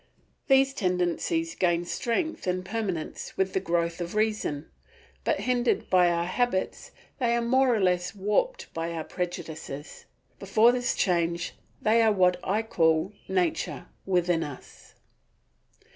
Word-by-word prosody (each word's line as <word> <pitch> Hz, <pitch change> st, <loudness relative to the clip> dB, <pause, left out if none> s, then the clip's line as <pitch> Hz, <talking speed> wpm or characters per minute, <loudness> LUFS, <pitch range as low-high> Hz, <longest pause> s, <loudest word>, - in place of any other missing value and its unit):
These 270 Hz, 0 st, +4 dB
tendencies 185 Hz, -, 0 dB
gain 175 Hz, -, +1 dB
strength 245 Hz, -, -2 dB
and 185 Hz, 0 st, -1 dB
permanence 190 Hz, -5 st, -4 dB
with 190 Hz, 0 st, 0 dB
the -, -, +2 dB
growth 170 Hz, -1 st, -1 dB
of 175 Hz, +3 st, -5 dB
reason, 210 Hz, -9 st, 0 dB, 0.6 s
but -, -, 0 dB
hindered 250 Hz, -1 st, 0 dB
by 180 Hz, -2 st, +5 dB
our 170 Hz, 0 st, 0 dB
habits 215 Hz, +1 st, -1 dB, 0.3 s
they 235 Hz, -2 st, +2 dB
are 235 Hz, -, +1 dB
more 260 Hz, +2 st, +3 dB
or -, -, 0 dB
less 180 Hz, 0 st, +1 dB
warped 470 Hz, -, -1 dB
by 165 Hz, +1 st, -3 dB
our 160 Hz, -1 st, -3 dB
prejudices. 160 Hz, -5 st, -6 dB, 0.3 s
Before 215 Hz, +4 st, +4 dB
this 245 Hz, 0 st, 0 dB
change 170 Hz, -2 st, 0 dB, 0.3 s
they 225 Hz, +2 st, +4 dB
are 220 Hz, -1 st, +5 dB
what 180 Hz, -3 st, +3 dB
I 210 Hz, +4 st, 0 dB
call 165 Hz, -2 st, +2 dB
Nature 180 Hz, -1 st, -1 dB, 0.2 s
within 175 Hz, -3 st, +2 dB
us. 145 Hz, -3 st, -11 dB
185 Hz, 135 wpm, -27 LUFS, 170-230 Hz, 0.6 s, by